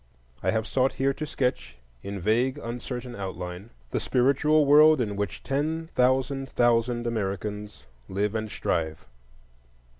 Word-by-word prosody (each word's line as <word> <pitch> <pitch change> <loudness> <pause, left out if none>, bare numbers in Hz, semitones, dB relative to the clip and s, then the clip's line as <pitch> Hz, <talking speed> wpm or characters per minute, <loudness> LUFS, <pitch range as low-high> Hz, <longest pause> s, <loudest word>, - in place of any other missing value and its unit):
I - - 0
have 110 0 +1
sought 130 +3 +1
here 135 +1 +1
to 155 +2 -5
sketch, 125 - -2 0.2
in 100 0 -5
vague, 120 +8 +1
uncertain 125 -1 -6
outline, 90 +1 -6 0.2
the - - 0
spiritual 140 +4 +3
world 150 +1 +7
in 105 -4 -1
which 100 0 -4
ten 155 +4 -2
thousand 130 +2 +1
thousand 120 0 +2
Americans 105 - -3 0.3
live 100 +2 -1
and 110 -1 -2
strive. 80 -5 -2
120 Hz, 130 wpm, -26 LUFS, 105-135 Hz, 0.3 s, world